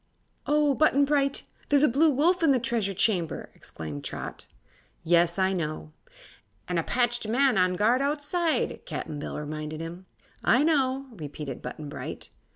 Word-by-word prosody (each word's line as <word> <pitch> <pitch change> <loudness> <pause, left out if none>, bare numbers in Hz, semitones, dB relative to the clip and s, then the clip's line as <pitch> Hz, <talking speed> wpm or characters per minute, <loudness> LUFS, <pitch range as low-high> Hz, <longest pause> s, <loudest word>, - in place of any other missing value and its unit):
"Oh, 295 -1 +3
Button 285 -1 +4
Bright! 275 -1 +1 0.3
There's 285 0 +4
a - - +7
Blue 290 +6 +4
Wolf 330 +7 +3
in 325 - +4
the 265 - +4
Treasure 225 -5 -1
Chamber!" 180 -5 0
exclaimed 75 -3 -8
Trot. - - -6 0.6
"Yes; 170 +1 +3
I 190 0 +2
know." 155 - -4 0.7
"An' 175 -1 0
a - - -1
patched 240 0 0
man 255 +3 +3
on 185 -1 +3
guard 230 +7 +3
outside," 300 +4 0
Cap'n 150 -2 -5
Bill - - -5
reminded 155 +1 -5
him. 170 +3 -7 0.4
"I 255 +4 +4
know," 275 -4 +1
repeated 150 - -7
Button 145 +4 -7
Bright. 145 - -6
225 Hz, 155 wpm, -27 LUFS, -, 0.7 s, a